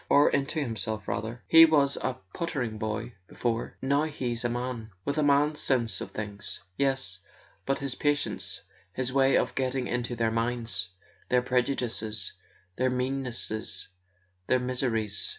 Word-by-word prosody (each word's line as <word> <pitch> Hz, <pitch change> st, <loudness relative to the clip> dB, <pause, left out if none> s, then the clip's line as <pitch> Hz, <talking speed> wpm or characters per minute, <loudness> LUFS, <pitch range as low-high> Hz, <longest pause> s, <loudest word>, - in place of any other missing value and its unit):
"Or 145 Hz, -, +6 dB
into 140 Hz, +3 st, 0 dB
himself, 110 Hz, -5 st, -3 dB
rather. 115 Hz, +3 st, -3 dB
He 165 Hz, 0 st, +10 dB
was 145 Hz, -3 st, +3 dB
a 130 Hz, -, -1 dB, 0.2 s
pottering 130 Hz, -10 st, -2 dB
boy 110 Hz, +2 st, -3 dB, 0.2 s
be¬ -, -, -15 dB
fore—now 130 Hz, +5 st, 0 dB
he's 125 Hz, -6 st, -3 dB
a 120 Hz, -, +1 dB
man, 120 Hz, -2 st, -3 dB, 0.2 s
with 140 Hz, +2 st, 0 dB
a -, -, +3 dB
man's 145 Hz, +1 st, +3 dB
sense 120 Hz, -4 st, +1 dB
of -, -, -4 dB
things." 100 Hz, -2 st, -5 dB, 0.2 s
"Yes; 130 Hz, -9 st, 0 dB, 0.5 s
but 135 Hz, -, +2 dB
his 140 Hz, -2 st, -2 dB
patience, 145 Hz, +1 st, -1 dB, 0.3 s
his 130 Hz, +2 st, -2 dB
way 135 Hz, 0 st, +5 dB
of -, -, +1 dB
getting 130 Hz, -1 st, 0 dB
into 120 Hz, 0 st, -2 dB
their 115 Hz, -1 st, +1 dB
minds, 115 Hz, -5 st, -1 dB, 0.4 s
their 125 Hz, 0 st, +4 dB
prejudices, 120 Hz, -5 st, 0 dB, 0.4 s
their 130 Hz, +1 st, +3 dB
meannesses, 125 Hz, -4 st, -2 dB, 0.6 s
their 130 Hz, -, +4 dB
mis¬ 125 Hz, 0 st, -1 dB
eries 110 Hz, -5 st, 0 dB
125 Hz, 150 wpm, -29 LUFS, 115-135 Hz, 0.6 s, He